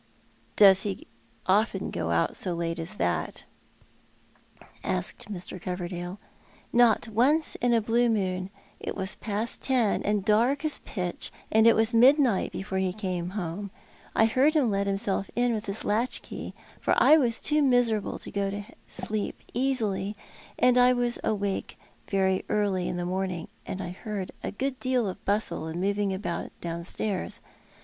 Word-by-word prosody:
" - - -34
Does 195 -2 +7
ho 200 -2 -1 0.5
often 205 +5 +1
go - - -2
out - - +1
so 180 -3 -2
late 165 0 -2
as 165 +6 -3
that? - - -1 0.7
" - - -26 0.2
asked 185 +2 -3
Mr. 185 -1 -7
Coverdale. 180 0 -4 0.3
" - - -28 0.2
Not 235 -1 +4
once 265 +9 +2
in 245 0 +3
a 230 -1 +4
blue 235 +2 +2
moon. 185 -4 -1 0.3
It - - -4
was 190 +1 -2
past 215 +2 -3
ten, 245 -6 +2
and 205 -1 0
dark 240 +8 +3
as 305 - -1
pitch; 180 -4 -4 0.2
and 220 +1 +5
it 230 - +7
was 225 +1 +2
midnight 250 -2 +5
before 190 0 -3
he 185 -1 0
came 180 -4 -3
home. 190 +2 -4 0.5
I 220 - +5
heard 265 +7 +3
him 265 -8 +3
let 200 0 0
himself 195 0 -1
in 245 0 +2
with 215 -1 -4
his 200 +2 -4
latchkey, 225 +5 -2 0.2
for - - +2
I 310 - +7
was 240 -6 +2
too 300 0 +1
miserable 245 -6 +2
to - - -9
go 200 -1 -1
to 205 +1 -4 0.2
sleep 215 -1 -3
easily; 220 -6 0 0.4
and 250 0 +5
I 250 0 +6
was 245 -1 +1
awake 200 -2 -2 0.3
very 190 -1 +1
early 200 -4 +1
in - - -2
the 175 - -2
mrirning, 180 -1 -2 0.2
and 190 - -4
I - - -5
heard 195 0 -5
a - - -3
good 265 +4 -3
deal 255 -4 +1
of 185 - -6
bustle 200 -5 0
and 160 +2 -4
moving 200 +1 0
about 190 -2 -3
downstairs. 175 +4 -3
205 Hz, 165 wpm, -27 LUFS, 190-235 Hz, 0.7 s, Does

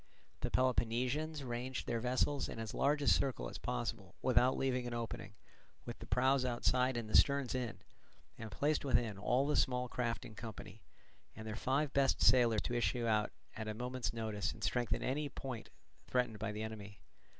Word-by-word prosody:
The - - -1
Peloponnesians 130 +5 +1
ranged 125 +1 -3
their 115 - -1
vessels 130 +4 +1
in - - -6
as 110 -1 -5
large 145 +1 +2
a - - -1
circle 125 - +2
as - - -7
possible - - -3
without 130 +1 +4
leaving 125 -2 0
an 120 - -3
opening, 115 -3 -5 0.5
with - - -7
the - - -9
prows 130 +1 +3
outside 125 +1 +2
and 115 -2 -3
the 110 - -2
sterns 140 -2 +4
in; 120 -7 -2 0.6
and 110 - -7
placed 145 +8 0
within 115 -7 +1
all 125 +6 +2
the 150 - +1
small 125 -1 +2
craft 120 -1 -2
in 110 - -10
company, 110 0 -8 0.5
and 110 - -8
their 110 -1 -4
five 135 +5 0
best 135 -1 +3
sailers 120 -4 +5
to 120 - -2
issue 120 0 +1
out 105 -2 +2 0.2
at 110 -1 -5
a 110 - -3
moment's 125 0 -2
notice 110 -3 -2
and - - -10
strengthen 120 -2 0
any 145 +3 -1
point 130 -4 -6 0.4
threatened 125 -4 0
by 110 0 -2
the 105 +1 -4
enemy. 105 -2 -7
125 Hz, 185 wpm, -36 LUFS, 110-130 Hz, 0.6 s, sailers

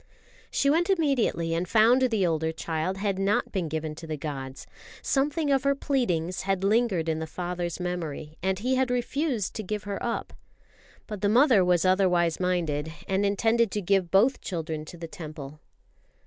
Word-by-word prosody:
She 280 - 0
went 335 +6 +3
immediately 275 - +1
and 170 +2 -1
found 230 +4 +5
the 225 -7 +2
older 160 -1 0
child 160 +3 -3
had 195 -1 -1
not 195 +2 +1
been 185 -4 -1
given 155 0 -3
to 165 - -9
the 155 -1 -3
gods. 135 -3 -6 0.4
Something 290 +2 +1
of 270 -1 +2
her 280 0 +2
pleadings 185 - -1
had 195 -1 -1
lingered 200 -5 +2
in 160 -1 0
the 160 - -4
father's 175 +1 -4
memory, 165 -4 -4
and 190 +1 0
he 250 +6 -1
had 260 -1 +1
refused 250 - -1
to - - -2
give 210 +2 -4
her 200 -1 -5
up. 235 - -3 0.7
But 210 -3 -7
the 205 - +2
mother 235 -3 +5
was 180 0 +2
otherwise 180 -3 +2
minded, 165 -4 -1 0.2
and 195 +1 +1
intended 225 +3 +2
to 210 - -1
give 190 -1 +2
both 215 +9 +3
children 160 -4 -4
to 175 - -10
the 165 0 -7
Temple. 155 -5 -9
190 Hz, 175 wpm, -27 LUFS, 165-230 Hz, 0.7 s, found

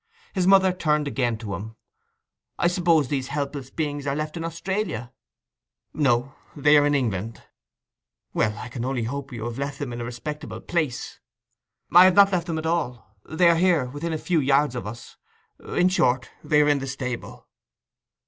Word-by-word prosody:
His 185 -2 +1
mother 190 -1 +5
turned 150 -4 0
again 120 -5 -1
to 110 -3 -6
him. 110 +5 -7 0.8
'I - - +2
suppose 170 -5 +2
these 130 -1 -2
helpless 140 -2 -4
beings 145 -2 -3
are 140 - 0
left 155 +1 -3
in 165 - -4
Australia?' 165 - -3 0.8
'No. 135 -2 +1 0.2
They 145 +1 +4
are 145 0 +5
in 145 - +2
England.' 115 -4 -2 0.9
'Well, 105 0 0
I 125 - -7
can 120 -1 -5
only 130 -2 -1
hope 135 +4 -5
you've 120 +1 -5
left 140 0 -3
them 135 -4 -5
in 120 - -5
a - - -3
respectable 145 +6 -6
place.' 155 -8 -3 0.7
'I 175 +2 +9
have 185 -1 +5
not 200 0 +7
left 175 -2 -1
them 165 -2 -2
at 160 - -4
all. 135 -10 -2
They 170 +2 +3
are 170 - +6
here—within 165 -3 +1
a 160 - -1
few 170 +1 0
yards 140 0 +2
of 120 -4 -5
us. 115 +3 -10 0.4
In 180 - +1
short, 130 -8 +1
they 150 -1 +4
are - - +1
in 145 -1 +3
the 135 - -5
stable. 125 -2 -6
145 Hz, 175 wpm, -24 LUFS, 125-165 Hz, 0.9 s, I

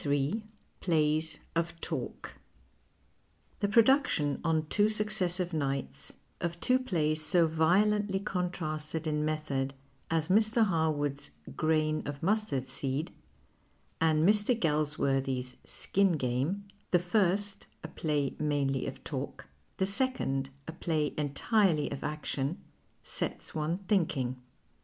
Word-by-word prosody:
121 145 +10 0 0.3
PLAYS 155 -2 +1 0.2
OF 170 0 -1
TALK 150 -8 -5 1.3
The 205 - +1
production 220 - +3
on 160 -2 +1
two 205 +7 +3
successive 190 -5 +2
nights 135 - -3 0.2
of 170 0 -3
two 255 +7 +3
plays 155 -10 0
so 175 +1 +4
violently 190 +5 +2
contrasted 165 -5 -3
in 150 -1 0
method 145 -3 -1 0.3
as 160 -1 +1
Mr. 220 +4 +4
Har 160 -5 +2
wood's 145 - -3 0.3
Grain 155 -1 +1
of 145 0 -6
Mustard 185 -10 0
Seed 135 +4 -2 0.9
and 160 0 +4
Mr. 210 +3 +3
Galsworthy's 135 - 0
Skin 195 -2 +1
Game 140 +8 -1
— 205 - -37
the 180 - +5
first 195 +2 0 0.2
a - - -4
jilay 150 -4 -1
mainly 140 -3 0
of - - -7
talk, - - -5 0.3
the 190 - +2
second 195 - 0 0.2
a - - -4
play 155 -2 -1
entirely 150 +2 +1
of 140 - -5
action 150 0 -2 0.3
— - - -40 0.2
sets - - -4
one 155 +2 -1
thinking. 135 -10 0
160 Hz, 120 wpm, -30 LUFS, 145-190 Hz, 1.3 s, the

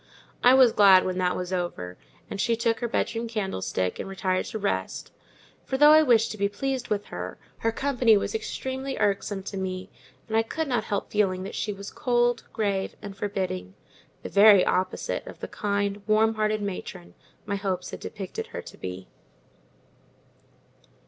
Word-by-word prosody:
I 250 +1 +7
was 260 -3 +7
glad 195 -3 +6
when 185 0 -2
that 180 -1 +1
was 180 0 -4
over, 175 - -3 0.3
and 200 - -4
she 230 +1 +2
took 230 0 0
her 240 - -1
bedroom 230 0 -1
candlestick 190 - -2
and - - -5
retired 185 -1 -1
to 220 - -5
rest; 200 -1 -3 0.5
for 265 - -2
though 295 +2 +8
I 310 0 +8
wished 235 -6 +4
to 215 - -8
be 200 0 +2
pleased 260 +3 -3
with 205 -1 -1
her, - - -5 0.2
her 225 - +1
company 245 -3 +3
was - - -2
extremely 265 -10 -4
irksome 200 -1 0
to 200 0 -6
me; 185 0 -4 0.4
and 220 - -3
I 225 - +5
could 315 +8 -3
not 245 -3 0
help 200 - -3
feeling 190 -3 +1
that 195 - -6
she 210 - -2
was 200 0 -8
cold, 240 -1 +1
grave, 200 -3 -1
and 200 -2 -8
forbidding—the 185 - -6
very 200 -2 +7
opposite 185 0 -1
of - - -10
the - - -5
kind, 200 0 -2
warm 220 +1 +4
hearted 215 -1 0
matron 90 - -6 0.3
my 200 -1 -2
hopes 190 -2 -3
had - - -7
depicted 195 -3 -6
her - - -6
to - - -12
be. 90 0 -6
205 Hz, 175 wpm, -26 LUFS, 190-230 Hz, 0.5 s, though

